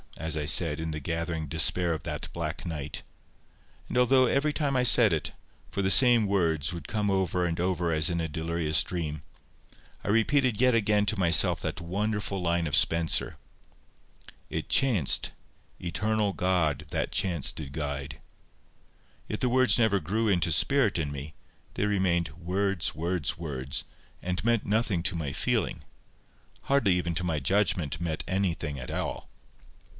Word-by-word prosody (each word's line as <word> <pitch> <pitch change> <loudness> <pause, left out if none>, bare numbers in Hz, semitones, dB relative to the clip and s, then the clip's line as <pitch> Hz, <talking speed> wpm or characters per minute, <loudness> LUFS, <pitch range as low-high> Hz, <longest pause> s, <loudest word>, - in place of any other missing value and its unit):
as 80 -1 -1
I 75 - -2
said, 75 +1 +3
in 80 0 -4
the 75 - -4
gathering 80 +1 -3
despair 85 +4 +2
of 80 - -6
that - - -5
black - - -5
night. 75 -3 -4 0.9
And - - -3
although 130 +1 +4
every 140 +4 +1
time 145 -3 -1
I 125 - +2
said 115 -5 +7
it—for 80 +4 -6
the 95 - +3
same 120 -3 +7
words 85 -6 0
would 85 -4 -8
come 105 -2 -1
over 90 -2 0
and 85 -1 -2
over 90 -1 -1
as 80 -1 +4
in 85 -1 -1
a 80 - -2
delirious 80 0 0
dream—I 75 -4 -9
repeated 115 +2 +2
yet 130 -1 +4
again 105 -2 +2
to 105 0 0
myself 85 -2 +3
that - - -4
wonderful 100 +2 -2
line 85 -1 0
of 75 - 0
Spenser,— 85 -1 +2 1.1
"It - - -5
chanced—eternal 105 - -1
God 85 -6 0
that 80 -1 -2
chance 90 -5 +1
did 75 -3 -8
guide," 70 -2 -5 1.1
yet 105 - -5
the 125 - +1
words 130 -4 +4
never 110 -4 +3
grew 110 +5 -1
into 85 -4 +1
spirit 115 - +2
in 75 -3 -2
me; 70 +2 -7 0.4
they - - 0
remained 95 -5 0
"words, 95 0 -1
words, 85 -1 -2
words," 70 -5 -4 0.4
and 90 +1 -3
meant 115 -1 +1
nothing 105 -5 0
to 95 -1 0
my 75 -4 -3
feeling—hardly 115 - -3
even 85 -1 -2
to 90 - -2
my 80 -4 -1
judgment 85 -3 0
meant 80 -2 -2
anything 85 -6 -2
at 65 - -7
all. - - -4
90 Hz, 150 wpm, -27 LUFS, 80-105 Hz, 1.1 s, said